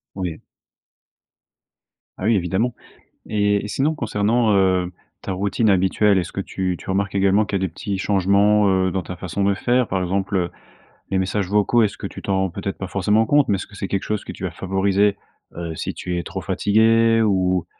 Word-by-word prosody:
Oui. 90 -4 -4 1.8
Bah 95 - -5
oui 115 0 +4
évidemment. 95 +7 0 0.6
Et 105 -1 +1
et - - -5
sinon 140 +8 0
concernant, 110 -1 +1
heu, 95 -2 +2 0.3
ta - - -5
routine 100 +4 0
habituelle 95 +2 +3
est 90 - +1
ce 85 - -9
que 95 - -3
tu 95 -1 -3
tu - - -11
remarques 100 +1 0
également 100 +2 +3
qu'il 100 - -1
y - - -6
a - - +1
des 80 - -12
petits 100 +3 -4
changements, 100 +1 +3
heu, 95 -1 +2
dans 95 0 -2
ta 90 - -7
façon 95 +2 -3
de 100 0 +3
faire 120 +4 +1
par 95 -1 -1
exemple, 95 +2 -1
heu, 90 -1 0 0.6
les 95 - 0
messages 95 +1 -1
vocaux 105 +4 +3
est 105 - +4
ce 100 - -11
que - - -5
tu - - -10
t'en 95 -1 -1
rends 95 -1 0
peut-être 100 +3 -5
pas 95 - -5
forcément 105 +4 +2
compte 145 +3 +3
mais 100 - +2
est 95 - -3
ce - - -7
que 105 - -15
c'est 100 - -4
quelque 100 0 -2
chose 105 -1 -3
que - - -6
tu - - -10
vas - - -2
favoriser? 95 +1 +1 0.4
Heu, 85 -1 -5
si - - -4
tu 90 -1 -4
es 85 - -4
trop - - -6
fatigué 115 +2 +3
ou 95 -4 +1
100 Hz, 220 wpm, -21 LUFS, 95-105 Hz, 1.8 s, oui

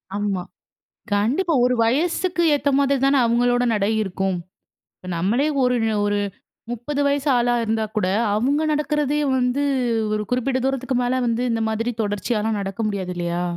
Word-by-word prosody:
ஆமா, 200 -3 -1 0.7
கண்டிப்பா. 275 - +1
ஒரு 250 0 +2
வயசுக்கு 340 +8 +1
ஏத்த 285 0 0
மாரி 280 0 +2
தானே 275 0 +4
அவர்களோட 245 +1 +2
நடை 205 0 +1
இருக்கும். 190 -1 -2 0.6
இப்ப 185 - -12
நம்மளே 220 - +1 0.2
ஒரு 250 0 +2 0.3
ஒரு 205 0 +1 0.5
30 245 +5 -3
வயசு 285 +1 0
ஆளா 240 0 +2
இருந்தா 220 0 0
கூட, 205 - +1 0.3
அவங்க 275 +7 +1
நடக்கிறதே 295 0 0 0.2
வந்து 255 +2 +1 0.5
ஒரு 210 - -1
குறிப்பிட்ட 255 +1 0
தூரத்துக்கு 265 -1 -1
மேல 255 +1 0
வந்து 235 +1 0
இந்த 225 - -1
மாதிரி 230 +2 -1
தொடர்ச்சியால 210 +2 -1
நடக்க 195 +3 -4
முடியாது 190 -3 -3
இல்லையா? 175 0 -2
245 Hz, 145 wpm, -22 LUFS, 210-275 Hz, 0.7 s, தானே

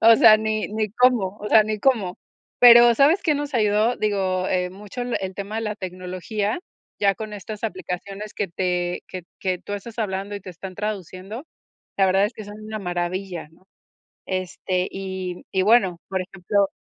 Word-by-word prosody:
o 230 0 +8
sea, 215 - +8
ni 215 0 -1
ni 215 0 -1
cómo, 230 -6 +3
o 210 - -4
sea, 215 -1 +6
ni 215 -1 -3
cómo. 215 -9 +2 0.4
Pero, 240 -1 +9
¿sabes 305 - +5
qué 305 -3 +2
nos 290 0 -3
ayudó? 215 +1 +2
Digo, 190 -3 0
eh, 180 -1 0
mucho 205 +4 -9
el 245 0 -1
el 190 -1 -4
tema 200 +2 -5
de 225 - -1
la 210 -1 -2
tecnología, 185 - -3 0.4
ya 200 -1 +3
con 215 -1 -6
estas 210 +2 -7
aplicaciones 195 +1 -5
que 205 - -2
te 180 0 -1
que 185 -2 -7 0.2
que 185 -2 -1
tú 205 - -8
estás 220 +3 -7
hablando 200 -1 -2
y 200 - -8
te 185 - -9
están 185 +2 -9
traduciendo, 205 - -5 0.5
la 195 - +5
verdad 195 +2 +4
es 225 - -7
que 215 - -8
son 205 +1 -9
una 215 0 -5
maravilla, 180 -2 -3
¿no? 165 +3 -25 0.6
Este 185 0 -2
y 190 -1 -4
m 175 - -11
y 190 -1 +2
bueno, 195 -5 +4
por 190 -1 -1
ejemplo 195 +1 0
200 Hz, 190 wpm, -23 LUFS, 185-215 Hz, 0.6 s, Pero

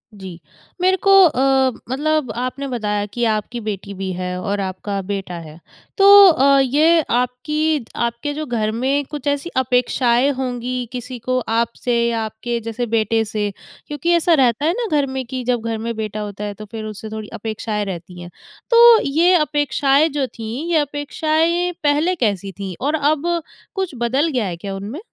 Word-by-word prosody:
जी, 190 -4 -9 0.4
मेरे 375 +1 +3
को 395 - +5
अ, 265 -3 +3 0.2
मतलब 300 +1 0
आपने 255 +3 -3
बताया 210 -5 -2
कि 240 +4 -4
आपकी 215 +3 -2
बेटी 200 -2 -5
भी 190 0 -4
है 180 0 -4
और 200 0 -2
आपका 195 +1 -4
बेटा 195 -1 -5
है। 160 -1 -12 0.4
तो 395 - +4 0.2
अ, 275 -3 +4
ये 305 +6 +4
आपकी 275 +4 0
आपके 235 +5 -2
जो 305 +1 -4
घर 225 -5 -1
में 265 +5 0
कुछ 295 -2 -6
ऐसी 285 +4 -1
अपेक्षाएँ 250 0 +2
होंगी 250 -1 -3
किसी 250 0 -6
को 255 +2 -1
आप 230 +1 +1
से 245 -1 +1
या 230 -1 -1
आपके 220 +2 -4
जैसे 230 +2 -4
बेटे 225 0 +1
से 210 -1 -2 0.4
क्योंकि 295 +3 -2
ऐसा 340 0 +3
रहता 265 -2 +2
है 325 - +3
ना 475 -2 -2
घर 285 - +2
में 265 -1 -4
कि 255 +1 -5
जब 245 -1 0
घर 225 -1 -2
में 230 +1 -4
बेटा 215 -1 -4
होता 205 -1 -6
है 205 - -4
तो 215 +2 -10
फिर 220 -1 -6
उससे 215 0 -7
थोड़ी 215 -1 -6
अपेक्षाएँ 215 -1 -3
रहती 180 -1 -7
हैं, 175 - -9 0.4
तो 470 -1 +8
ये 330 +6 +3
अपेक्षाएँ 290 -2 +2
जो 285 -2 -1
थी, 225 -3 -8 0.2
ये 330 - +3
अपेक्षाएँ 315 +4 0
पहले 300 +5 +2
कैसी 200 - -1
थी? 195 -1 -6
और 290 +3 0
अब 310 +3 0 0.3
कुछ 380 -2 -2
बदल 255 +6 +1
गया 250 -6 0
है 175 -2 -5
क्या 195 +3 -6
उनमें? 205 - -6
245 Hz, 180 wpm, -19 LUFS, 215-290 Hz, 0.4 s, तो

